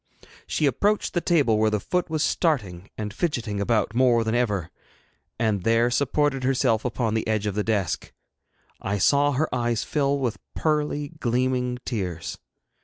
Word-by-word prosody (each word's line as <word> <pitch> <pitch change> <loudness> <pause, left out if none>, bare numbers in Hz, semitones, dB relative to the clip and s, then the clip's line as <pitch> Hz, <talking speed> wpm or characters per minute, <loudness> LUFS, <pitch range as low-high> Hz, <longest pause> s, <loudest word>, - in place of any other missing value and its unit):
She 155 - 0
approached 205 +9 +1
the 175 - +1
table 140 -12 +2
where 110 0 +3
the 105 0 0
foot 180 - -1
was 155 -1 0
starting 100 - 0
and 105 -1 -4
fidgeting 115 -8 -2
about 105 0 +1
more 120 -1 +4
than 110 0 -1
ever, 105 -8 0 0.7
and 110 -3 0
there 115 +4 +2
supported 140 +1 +1
herself 125 -4 +2
upon 115 -2 -1
the 110 - -1
edge 110 -1 0
of 105 - -1
the 105 +1 -1
desk. 95 -9 -1 0.7
I 100 +1 -1
saw 145 +8 +3
her 155 +4 +1
eyes 120 -2 0
fill 140 -2 0
with 125 -5 -2 0.2
pearly 150 -2 0
gleaming 125 0 0
tears. 90 -8 -4
120 Hz, 160 wpm, -25 LUFS, 105-140 Hz, 0.7 s, more